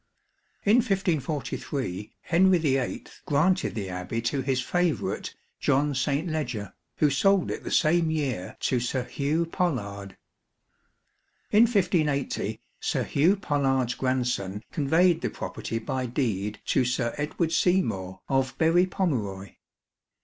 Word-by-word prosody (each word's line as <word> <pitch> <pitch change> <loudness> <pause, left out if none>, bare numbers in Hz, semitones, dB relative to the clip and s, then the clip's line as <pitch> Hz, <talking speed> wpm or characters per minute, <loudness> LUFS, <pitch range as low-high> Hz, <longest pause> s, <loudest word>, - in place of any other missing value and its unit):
In 210 +4 +6
1543, 150 - -1
Henry 185 +2 +4
VIII 135 -6 0 0.2
granted 165 - +2
the 100 -4 -3
Abbey 90 +5 -3
to 135 +4 0
his 130 -1 0
favourite 175 +5 -1 0.2
John 145 +2 +2
St. 140 +5 0
Ledger, 125 -10 -3 0.2
who 150 -2 +3
sold 195 +1 +3
it - - -5
the - - -5
same 165 +1 +3
year 135 -12 -2
to 125 - +1
Sir 125 +1 -1
Hugh 150 +6 -1
Pollard. 100 - -3 1.3
In 215 +3 +7
1580, 175 - 0 0.2
Sir - - -1
Hugh 165 +8 +3
Pollard's 135 - 0
grandson 125 -6 -1
conveyed 165 +4 +3
the - - -1
property 115 - -5
by 125 +3 -2
deed 105 -5 -2
to - - +2
Sir 120 -1 -1
Edward 155 +2 -1
Seymour, 110 - +1
of 135 -1 0
Berry 170 +3 +4
Pomeroy. 110 - -2
140 Hz, 120 wpm, -27 LUFS, 120-170 Hz, 1.3 s, In